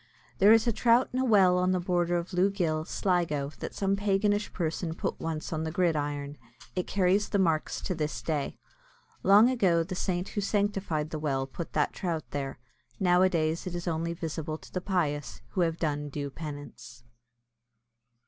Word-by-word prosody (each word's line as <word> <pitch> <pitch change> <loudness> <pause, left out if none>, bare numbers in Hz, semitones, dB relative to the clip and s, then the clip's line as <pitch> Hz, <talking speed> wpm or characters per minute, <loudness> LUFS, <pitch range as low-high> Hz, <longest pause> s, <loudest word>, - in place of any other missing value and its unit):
There 205 +2 +7
is 225 0 +6
a 235 - +3
trout 235 +3 +3
in 255 - 0
a - - +2
well 190 -6 +5
on 185 +1 +2
the 185 - +1
border 175 -1 +1
of 170 +1 -5
Lough 180 +2 +3
Gill, 160 -6 -1
Sligo, 165 -7 0
that - - -6
some 195 0 +1
paganish 205 +1 +1
person 165 -1 -2
put - - -3
once 160 0 -4
on 160 0 -2
the 160 - -2
gridiron. 145 -5 -1 0.4
It 180 - -1
carries 195 +1 +2
the - - +1
marks 165 -5 +1
to - - -2
this 155 -2 -3
day. 150 -3 -2 0.6
Long 205 +4 +7
ago, 190 -10 +3
the 185 +3 -6
saint 180 0 -2
who 205 - -2
sanctified 195 -7 -1
the 155 - -3
well 135 -3 -1
put 160 +5 -7
that 150 - +1
trout 165 -4 -2
there. 140 -1 -3 0.4
Nowadays 180 -3 +2
it 175 - -4
is 175 +1 -5
only 170 0 -1
visible 160 -2 -4
to - - -16
the 185 - -2
pious, 155 -7 -2
who 185 - -1
have 165 -1 +1
done 150 -3 -2
due 140 0 -4
penance. 145 -6 -9
175 Hz, 180 wpm, -29 LUFS, 155-190 Hz, 0.6 s, There